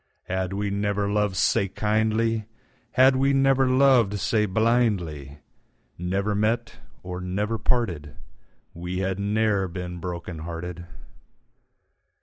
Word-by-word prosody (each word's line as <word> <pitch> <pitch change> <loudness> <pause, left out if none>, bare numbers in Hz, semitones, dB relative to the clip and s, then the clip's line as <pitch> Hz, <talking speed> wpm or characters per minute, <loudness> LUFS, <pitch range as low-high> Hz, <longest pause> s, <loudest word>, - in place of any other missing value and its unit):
Had 95 0 -2
we 100 +1 -2
never 100 0 0
lov'd 105 -2 +1
sae 95 +1 +2
kindly, 110 +2 0 0.5
Had 130 +1 +6
we 135 +1 +2
never 135 -1 +3
lov'd 130 -6 +4
sae 105 +1 +1
blindly, 95 - 0 0.6
Never 95 +4 -1
met—or 105 -4 -3
never 105 +5 -2
parted, 85 - -1 0.6
We 90 +2 -5
had 95 0 -1
ne'er 105 -1 +1
been 90 0 -6
broken 85 -1 -6
hearted. 85 +1 -6
100 Hz, 110 wpm, -25 LUFS, 90-115 Hz, 0.6 s, Had